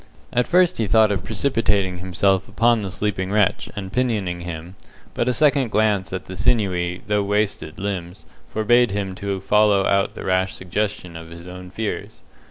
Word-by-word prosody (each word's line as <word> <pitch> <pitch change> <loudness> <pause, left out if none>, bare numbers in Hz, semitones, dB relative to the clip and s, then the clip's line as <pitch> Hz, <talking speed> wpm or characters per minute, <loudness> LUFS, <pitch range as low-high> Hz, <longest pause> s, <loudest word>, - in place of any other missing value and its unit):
At 125 0 +2
first 180 0 +3
he 110 - +1
thought 110 0 +5
of 100 - -1
precipitating 105 -6 0
himself 95 +1 +1
upon 115 -1 +2
the 100 - -4
sleeping 100 -1 -2
wretch 105 +1 +1
and 95 -2 -6
pinioning 105 -9 0
him, 85 0 -7 0.4
but 120 - -1
a - - +3
second 140 -1 +3
glance 105 -3 +1
at 95 - -4
the 95 - -8
sinewy, 90 -4 0
though 105 -1 +1
wasted, 100 -5 -1
limbs 95 -2 -5 0.2
forbade 120 +2 +3
him 100 -1 -3
to 100 0 -3
follow 105 0 +3
out 100 0 +1
the - - -7
rash 95 0 +1
suggestion 95 -1 -3
of 80 0 -9
his 85 +1 -11
own 90 0 -9
fears. 110 +2 -5
100 Hz, 175 wpm, -22 LUFS, 95-110 Hz, 0.4 s, thought